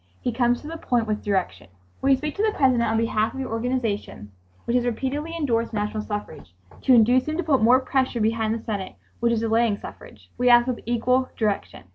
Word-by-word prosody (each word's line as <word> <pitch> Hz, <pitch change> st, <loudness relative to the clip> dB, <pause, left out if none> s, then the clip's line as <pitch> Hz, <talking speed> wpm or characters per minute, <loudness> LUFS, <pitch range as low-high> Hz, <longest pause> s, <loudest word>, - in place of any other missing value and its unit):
He 245 Hz, -, -2 dB
comes 240 Hz, 0 st, +1 dB
to 295 Hz, -, -10 dB
the 330 Hz, +1 st, -6 dB
point 240 Hz, -6 st, 0 dB
with 215 Hz, -1 st, -3 dB
direction. 190 Hz, -, -2 dB, 0.3 s
"Will 270 Hz, -, +1 dB
you 270 Hz, -, +5 dB
speak 300 Hz, +2 st, -4 dB
to -, -, 0 dB
the 435 Hz, -1 st, 0 dB
President 250 Hz, -5 st, +3 dB
on 220 Hz, -, +1 dB
behalf 225 Hz, 0 st, 0 dB
of -, -, -6 dB
your 260 Hz, -3 st, -4 dB
organization, 225 Hz, -, -3 dB, 0.3 s
which 235 Hz, -, -1 dB
has 250 Hz, -, +3 dB
repeatedly 275 Hz, +7 st, -3 dB
endorsed 235 Hz, -7 st, -1 dB
national 210 Hz, 0 st, -2 dB
suffrage, 205 Hz, -, -7 dB, 0.3 s
to 260 Hz, -, +4 dB
induce 245 Hz, +4 st, +4 dB
him 310 Hz, +1 st, -2 dB
to 355 Hz, -, -1 dB
put 285 Hz, -6 st, +2 dB
more 245 Hz, +4 st, +6 dB
pressure 260 Hz, -2 st, -1 dB
behind 220 Hz, 0 st, 0 dB
the 230 Hz, -, -7 dB
Senate 200 Hz, -4 st, -4 dB, 0.2 s
which 235 Hz, 0 st, +2 dB
is 230 Hz, -1 st, 0 dB
delaying 225 Hz, -1 st, +1 dB
suffrage?" -, -, -12 dB
we 250 Hz, 0 st, +3 dB
asked 240 Hz, 0 st, +6 dB
with 250 Hz, -2 st, -2 dB
equal 250 Hz, +2 st, +1 dB
direction. 210 Hz, -, -2 dB
235 Hz, 215 wpm, -24 LUFS, 220-260 Hz, 0.3 s, more